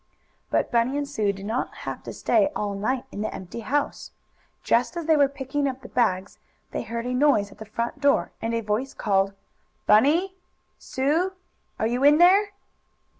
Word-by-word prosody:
But -, -, 0 dB
Bunny 240 Hz, +4 st, +2 dB
and 290 Hz, -1 st, -2 dB
Sue 215 Hz, -8 st, 0 dB
did 195 Hz, 0 st, -9 dB
not 225 Hz, +4 st, -2 dB
have -, -, -5 dB
to -, -, -5 dB
stay 300 Hz, -3 st, +2 dB
all 205 Hz, -1 st, -2 dB
night 240 Hz, +6 st, -2 dB
in 205 Hz, -, -5 dB
the 215 Hz, -, -2 dB
empty 190 Hz, +5 st, -7 dB
house. 280 Hz, +6 st, -2 dB, 0.5 s
Just 245 Hz, +8 st, +1 dB
as 340 Hz, -, -3 dB
they 320 Hz, 0 st, +4 dB
were 285 Hz, -2 st, +5 dB
picking 280 Hz, +1 st, -2 dB
up 265 Hz, 0 st, -7 dB
the 250 Hz, -, -11 dB
bags, 195 Hz, -6 st, 0 dB, 0.3 s
they -, -, -3 dB
heard 235 Hz, 0 st, -5 dB
a 250 Hz, -, -2 dB
noise 250 Hz, -7 st, +3 dB
at -, -, -17 dB
the 220 Hz, -, -7 dB
front 235 Hz, +6 st, -4 dB
door 280 Hz, -1 st, +2 dB
and 230 Hz, +1 st, -1 dB
a 230 Hz, -, 0 dB
voice 220 Hz, +5 st, -2 dB
called: 195 Hz, -2 st, +1 dB, 0.5 s
"Bunny! 305 Hz, -, +4 dB, 0.5 s
Sue! 315 Hz, +8 st, 0 dB, 0.4 s
Are -, -, 0 dB
you 245 Hz, +4 st, 0 dB
in 290 Hz, +1 st, +7 dB
there?" 385 Hz, +4 st, +6 dB
250 Hz, 185 wpm, -25 LUFS, 215-290 Hz, 0.5 s, in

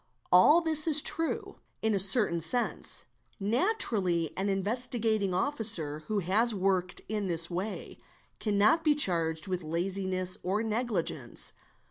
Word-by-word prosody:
a -, -, +4 dB
Jl 300 Hz, -, +5 dB
this 315 Hz, -1 st, +5 dB
is 305 Hz, -2 st, +10 dB
true, 325 Hz, +2 st, +1 dB, 0.2 s
in 220 Hz, -1 st, 0 dB
a 200 Hz, -, 0 dB
certain 190 Hz, -3 st, +3 dB
sense; 225 Hz, +1 st, -2 dB, 0.3 s
naturally 205 Hz, -, -1 dB
an 195 Hz, +2 st, -3 dB
Investigating 215 Hz, 0 st, -1 dB
Officer 185 Hz, -, -1 dB
who 215 Hz, -, -3 dB
has 210 Hz, +5 st, 0 dB
worked 185 Hz, -1 st, -2 dB
in 210 Hz, -2 st, -4 dB
this 170 Hz, 0 st, 0 dB
way, 190 Hz, +5 st, -6 dB, 0.4 s
cannot 215 Hz, +10 st, +1 dB
be 305 Hz, -2 st, +2 dB
charged 165 Hz, -, 0 dB
with 185 Hz, -1 st, -4 dB
laziness 185 Hz, +2 st, -1 dB
or 200 Hz, +4 st, -2 dB
neg 230 Hz, +3 st, -3 dB
5 180 Hz, -7 st, -1 dB
cence. 120 Hz, -5 st, -1 dB
200 Hz, 140 wpm, -28 LUFS, 180-235 Hz, 0.4 s, is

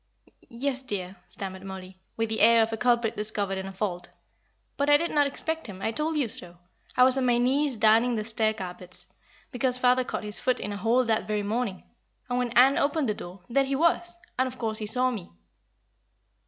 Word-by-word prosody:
"Yes, 260 Hz, +2 st, -2 dB
dear," 195 Hz, -7 st, -5 dB
stammered 190 Hz, -1 st, -7 dB
Mollie, 190 Hz, -1 st, -9 dB, 0.2 s
with 225 Hz, 0 st, -1 dB
the 220 Hz, -, -2 dB
air 230 Hz, +1 st, +6 dB
of 225 Hz, 0 st, -3 dB
a -, -, +1 dB
culprit 235 Hz, -1 st, +1 dB
discovered 205 Hz, -2 st, -2 dB
in 190 Hz, -, -6 dB
a -, -, -6 dB
fault; 185 Hz, -3 st, -4 dB, 0.7 s
"but 280 Hz, +1 st, 0 dB
I 290 Hz, -, +7 dB
did 335 Hz, +3 st, -3 dB
not 290 Hz, -1 st, +3 dB
expect 320 Hz, +1 st, -3 dB
him 190 Hz, -3 st, -9 dB
I 220 Hz, -, -1 dB
told 305 Hz, +5 st, -2 dB
you 280 Hz, -5 st, +1 dB
so. 175 Hz, -4 st, -8 dB, 0.4 s
I 250 Hz, -, +7 dB
was 260 Hz, +1 st, +5 dB
on 260 Hz, -, 0 dB
my 240 Hz, -1 st, +3 dB
knees 265 Hz, +2 st, +1 dB
darning 225 Hz, +3 st, +4 dB
the 215 Hz, -, -2 dB
stair 220 Hz, 0 st, 0 dB
carpets, 180 Hz, -2 st, -9 dB, 0.5 s
because 250 Hz, 0 st, +5 dB
father 250 Hz, 0 st, +3 dB
caught -, -, -5 dB
his 210 Hz, 0 st, 0 dB
foot 255 Hz, 0 st, 0 dB
in 205 Hz, -, -4 dB
a -, -, -5 dB
hole 235 Hz, +4 st, +2 dB
that 225 Hz, -1 st, 0 dB
very 210 Hz, -1 st, -1 dB
morning; 210 Hz, -2 st, -2 dB, 0.4 s
and 245 Hz, -1 st, -1 dB
when 250 Hz, -1 st, -1 dB
Ann 265 Hz, +3 st, +6 dB
opened 285 Hz, -2 st, 0 dB
the -, -, +1 dB
door, 180 Hz, -1 st, -10 dB
there 275 Hz, +3 st, +2 dB
he 270 Hz, 0 st, -2 dB
was, 340 Hz, +3 st, +1 dB, 0.2 s
and, 260 Hz, -, +3 dB
of 255 Hz, 0 st, -8 dB
course, 220 Hz, -2 st, -2 dB
he 215 Hz, -, -4 dB
saw 255 Hz, +4 st, +2 dB
me." 210 Hz, -8 st, -7 dB
230 Hz, 215 wpm, -26 LUFS, 205-255 Hz, 0.7 s, I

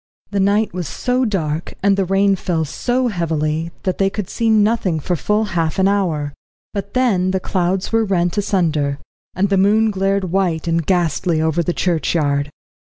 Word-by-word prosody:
The 200 Hz, -, 0 dB
night 205 Hz, +2 st, +2 dB
was 180 Hz, -3 st, -4 dB
so 250 Hz, -, 0 dB
dark, 165 Hz, -7 st, -2 dB
and 200 Hz, 0 st, +4 dB
the 195 Hz, -1 st, 0 dB
rain 195 Hz, +1 st, +3 dB
fell 170 Hz, -4 st, -1 dB
so 245 Hz, -, -1 dB
heavily, 160 Hz, -3 st, -1 dB
that 185 Hz, -2 st, -2 dB
they 195 Hz, 0 st, +3 dB
could 200 Hz, -1 st, -5 dB
see 230 Hz, -1 st, 0 dB
nothing 210 Hz, -6 st, +2 dB
for 175 Hz, +4 st, -1 dB
full 210 Hz, +6 st, 0 dB
half 165 Hz, 0 st, 0 dB
an 190 Hz, 0 st, +3 dB
hour. 165 Hz, -8 st, 0 dB, 0.4 s
But 200 Hz, +2 st, -5 dB
then 205 Hz, -8 st, +2 dB
the 190 Hz, 0 st, 0 dB
clouds 185 Hz, +1 st, -1 dB
were 225 Hz, 0 st, +3 dB
rent 175 Hz, -4 st, 0 dB
asunder, 160 Hz, -9 st, 0 dB, 0.4 s
and 195 Hz, +2 st, +1 dB
the 195 Hz, -, +2 dB
moon 215 Hz, +2 st, +3 dB
glared 195 Hz, -2 st, 0 dB
white 175 Hz, -4 st, 0 dB
and 165 Hz, 0 st, +1 dB
ghastly 175 Hz, -1 st, +1 dB
over 160 Hz, +1 st, +1 dB
the 175 Hz, -, -1 dB
churchyard. 155 Hz, -5 st, 0 dB
185 Hz, 175 wpm, -19 LUFS, 165-200 Hz, 0.4 s, and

